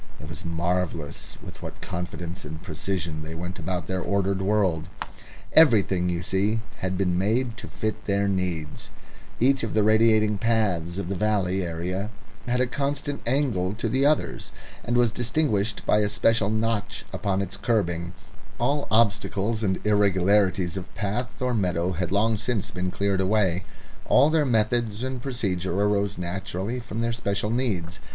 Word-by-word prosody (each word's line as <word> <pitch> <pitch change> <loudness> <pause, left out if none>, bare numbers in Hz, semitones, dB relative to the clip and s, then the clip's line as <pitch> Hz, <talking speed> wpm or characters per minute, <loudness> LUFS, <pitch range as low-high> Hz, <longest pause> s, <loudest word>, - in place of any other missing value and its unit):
It 75 - -9
was 80 +2 -6
marvellous 85 -2 -2
with - - -10
what - - -8
confidence 90 +1 -5
and 80 +1 -7
precision 90 -3 -3
they 80 +1 -7
went 90 +3 -5
about 90 0 -3
their 95 +1 -2
ordered 100 0 0
world. 95 -5 +1 0.6
Everything, 100 - +5
you 85 0 -2
see, 100 +5 +1 0.2
had 95 0 -2
been 90 -2 +1
made 115 +4 +1
to - - -7
fit 110 -1 -4
their 100 0 +1
needs; 90 -6 -2 0.5
each 135 +2 +3
of 115 - -2
the 110 - +4
radiating 110 -1 +4
paths 95 -7 0
of 100 - -3
the 100 - -2
valley 95 -2 +1
area 90 +4 -3 0.4
had 125 +1 +1
a 125 - +3
constant 140 +2 -2
angle 120 -9 +1
to 110 - -2
the 135 +1 +1
others, 150 +1 +1 0.3
and 120 - 0
was 120 -2 +4
distinguished 115 -4 0
by 105 - +4
a 105 -1 +2
special 105 0 +2
notch 110 -1 -1
upon 95 -1 0
its 100 0 -3
kerbing; 85 -6 0 0.4
all 145 0 0
obstacles 110 0 +2
and 95 -4 +1
irregularities 100 -3 +3
of 90 0 -7
path 120 +6 -3
or 125 -1 0
meadow 90 -4 +1
had 90 0 -2
long 110 +2 +2
since 110 -1 -2
been 90 0 -2
cleared 100 +1 0
away; 95 -2 +2 0.4
all 150 - +5
their 155 -2 +3
methods 115 -1 +1
and 130 -1 -3
procedure 95 -8 -1
arose 100 -1 +1
naturally 95 +5 -3
from 115 -1 -5
their 115 0 0
special 100 -1 -1
needs. 95 -9 -1
100 Hz, 160 wpm, -25 LUFS, 90-115 Hz, 0.6 s, Everything